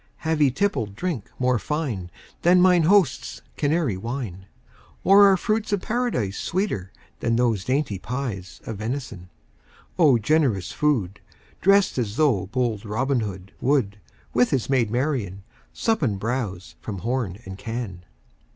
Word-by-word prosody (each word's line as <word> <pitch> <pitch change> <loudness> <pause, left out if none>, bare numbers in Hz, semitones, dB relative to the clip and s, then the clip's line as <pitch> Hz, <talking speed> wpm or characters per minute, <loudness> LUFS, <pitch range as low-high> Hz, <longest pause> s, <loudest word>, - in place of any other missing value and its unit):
Have 160 -1 +1
ye 145 - +6
tippled 130 - -1
drink 165 - -3
more 125 -2 +2
fine 125 - -3 0.3
Than 180 +1 +5
mine 180 -2 +5
host's 190 -10 +2
Canary 145 - 0
wine? 105 -4 -5 0.6
Or 200 +1 +7
are 190 - +4
fruits 215 +3 -1
of 200 - 0
Paradise 215 - -1
Sweeter 170 - -2 0.3
than 115 -1 +1
those 115 -5 +1
dainty 130 -7 0
pies 110 -8 -5
Of 110 - -5
venison? 110 -6 -5 0.7
O 145 -7 +6
generous 115 - +1
food! 115 -11 0 0.4
Drest 195 -6 +4
as 110 -3 -2
though 120 -12 +2
bold 115 -1 -1
Robin 125 +5 0
Hood 95 -3 -5
10 - - -4
Would, 105 -8 +1 0.3
with 125 +1 +3
his 135 -1 -1
maid 125 -5 +2
Marian, 120 -6 -2 0.3
Sup 225 -1 0
and 105 -9 0
bowse 100 -7 -3
from 105 -3 -5
horn 115 -6 -1
and 95 0 -8
can. 115 -6 -5
125 Hz, 145 wpm, -24 LUFS, 100-150 Hz, 0.7 s, Or